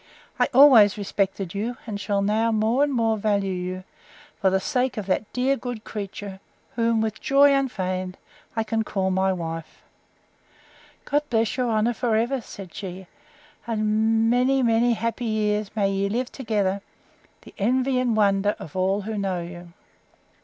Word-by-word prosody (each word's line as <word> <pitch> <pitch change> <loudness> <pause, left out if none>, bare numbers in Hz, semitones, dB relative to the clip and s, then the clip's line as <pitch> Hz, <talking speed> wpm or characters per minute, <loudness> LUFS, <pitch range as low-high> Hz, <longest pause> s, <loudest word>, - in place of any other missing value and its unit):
I - - +4
always 245 -7 +7
respected 195 -2 -2
you, 225 +4 -3
and 205 -3 -5
shall 200 -1 0
now 220 +3 +1
more 225 +5 +2
and 290 - +1
more 225 -3 +1
value 200 -2 0
you, 185 +1 -4 0.6
for 190 - +4
the 190 +1 +2
sake 255 +3 -1
of 210 - -3
that 195 +2 -1
dear 260 +2 +1
good 245 -4 -6
creature, 200 -2 -7 0.4
whom, 230 -1 +2
with 220 -1 -3
joy 280 +1 +5
unfeigned, 185 -9 -2 0.4
I 225 - +1
can 225 0 -1
call 190 -3 -1
my 190 +1 +2
wife. 165 -3 -6 1.2
God 290 +1 +1
bless 225 -2 +1
your 250 -2 0
honour 225 +2 +1
for 230 -1 0
ever! 240 +4 0
said 195 -4 -10
she; 190 -1 -7 0.6
and 220 0 +1
many 255 +3 +3
many 235 +1 +3
happy 230 +1 -3
years 210 -2 0
may 200 -2 +1
ye 195 0 0
live 245 +4 -2
together, 205 -6 -1 0.6
the - - -14
envy 255 +5 +1
and 240 -3 +1
wonder 200 0 +2
of 155 - -10
all 190 +2 +1
who 215 +1 -4
know 185 -3 -2
you! 175 0 -10
215 Hz, 160 wpm, -24 LUFS, 195-235 Hz, 1.2 s, always